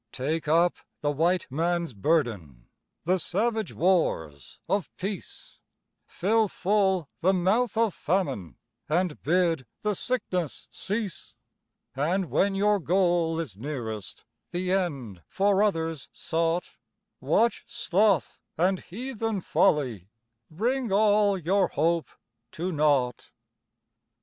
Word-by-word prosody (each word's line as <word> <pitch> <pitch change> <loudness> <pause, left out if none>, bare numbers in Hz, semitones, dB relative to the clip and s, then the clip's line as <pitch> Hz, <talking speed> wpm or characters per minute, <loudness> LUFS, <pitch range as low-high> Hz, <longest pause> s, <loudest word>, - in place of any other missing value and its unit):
Take 155 +5 -2
up 170 +3 +3 0.2
the 145 - +1
White 170 +5 +1
Man's 170 0 0
burden 100 - -1 0.4
The 185 +3 +2
savage 215 +3 -1
wars 80 - 0
of 200 -2 0
peace 195 -1 -7 0.5
Fill 220 +4 +2
full 190 -4 +1
the 190 +3 +3
mouth 205 +6 +1
of 225 -4 +2
Famine 155 - -2 0.3
And 170 0 0
bid 165 -5 +1
the 210 -1 0
sickness 185 - -3
cease; 205 -2 -4 0.6
And 170 +6 0
when 195 0 +2
your 205 +1 +3
goal 175 -2 +2
is 145 - -5
nearest 110 - -6 0.2
The 180 +1 -2
end 140 - -2
for 200 0 +2
others 165 -8 -1
sought, 165 +1 -2 0.4
Watch 235 +1 +2
Sloth 195 -1 +1 0.2
and 185 +3 +2
heathen 225 +1 -4
Folly 130 - +1 0.4
Bring 235 +7 -1
all 205 0 +4
your 185 +2 +2
hope 165 +2 0 0.4
to 180 +3 -3
naught. 145 -6 +1
175 Hz, 110 wpm, -27 LUFS, 150-195 Hz, 0.6 s, all